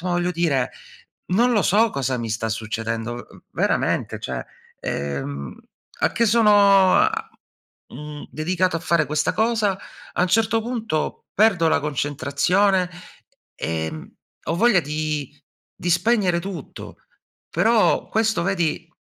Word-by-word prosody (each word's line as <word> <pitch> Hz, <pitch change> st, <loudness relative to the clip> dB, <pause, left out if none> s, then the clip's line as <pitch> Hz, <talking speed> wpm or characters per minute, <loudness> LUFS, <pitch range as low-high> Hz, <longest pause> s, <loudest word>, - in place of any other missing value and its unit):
Voglio 175 Hz, 0 st, 0 dB
dire 155 Hz, -7 st, 0 dB, 0.6 s
non 240 Hz, +6 st, +4 dB
lo 215 Hz, -4 st, +3 dB
so 220 Hz, +5 st, +3 dB
cosa 130 Hz, -2 st, -1 dB
mi 115 Hz, -1 st, -4 dB
sta 110 Hz, +1 st, -2 dB
succedendo. 115 Hz, +1 st, -3 dB, 0.2 s
Uhm, -, -, -17 dB
veramente, -, -, 0 dB
cioè -, -, -5 dB, 0.3 s
ehm, 70 Hz, -1 st, -4 dB, 0.5 s
a -, -, +3 dB
che 235 Hz, -, +2 dB
sono 205 Hz, -4 st, +5 dB
a -, -, -1 dB, 0.6 s
mhmm, 150 Hz, +2 st, -8 dB
dedicato 175 Hz, +2 st, 0 dB
a -, -, -6 dB
fare 170 Hz, -2 st, +1 dB
questa 150 Hz, +1 st, 0 dB
cosa, 220 Hz, -3 st, +1 dB, 0.4 s
a -, -, 0 dB
un 180 Hz, -, +3 dB
certo 225 Hz, +3 st, +2 dB
punto 225 Hz, -8 st, -3 dB
perdo 195 Hz, -6 st, +3 dB
la -, -, +3 dB
concentrazione, 150 Hz, +7 st, +1 dB, 0.7 s
ehm, 80 Hz, -1 st, -4 dB, 0.3 s
ho 165 Hz, -, -1 dB
voglia 215 Hz, 0 st, +4 dB
di 150 Hz, -1 st, -3 dB, 0.4 s
di 175 Hz, -, -3 dB
spegnere 180 Hz, 0 st, +2 dB
tutto. 190 Hz, 0 st, -8 dB, 0.5 s
Però 225 Hz, -1 st, +2 dB
questo 220 Hz, 0 st, +1 dB
vedi, 170 Hz, -4 st, -1 dB
175 Hz, 125 wpm, -22 LUFS, 140-205 Hz, 0.7 s, sono